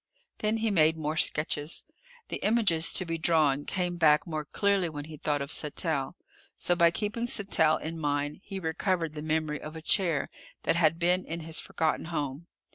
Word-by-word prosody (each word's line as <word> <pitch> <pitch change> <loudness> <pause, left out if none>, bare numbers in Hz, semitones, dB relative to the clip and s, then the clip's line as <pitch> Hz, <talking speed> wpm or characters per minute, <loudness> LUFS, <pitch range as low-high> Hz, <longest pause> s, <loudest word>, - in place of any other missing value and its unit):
Then 215 +1 0
he 225 -1 0
made 160 -3 +4
more 155 0 -2
sketches. 155 0 0 0.5
The - - -2
images 205 -8 +3
to 185 - +2
be 165 -1 -3
drawn 150 -4 +2
came 180 -2 -1
back 150 -3 +4
more 155 -2 -4
clearly 200 +2 +1
when 145 -2 -7
he 155 0 -9
thought 145 -1 -1
of 140 - -8
Sattell, 150 0 -1 0.4
so 175 - +2
by 170 -1 +5
keeping 215 +6 -2
Sattell 175 -8 +2
in 165 +1 -6
mind 145 -1 -1
he 195 -1 -6
recovered 165 -1 -1
the 150 - -6
memory 155 -1 -1
of 155 +1 -8
a 160 - -7
chair 170 -4 +1 0.3
that - - +2
had 165 -2 +3
been 180 +2 +2
in 165 +1 -5
his 160 0 0
forgotten 160 0 -1
home. 150 -1 -4
160 Hz, 185 wpm, -28 LUFS, 155-180 Hz, 0.5 s, by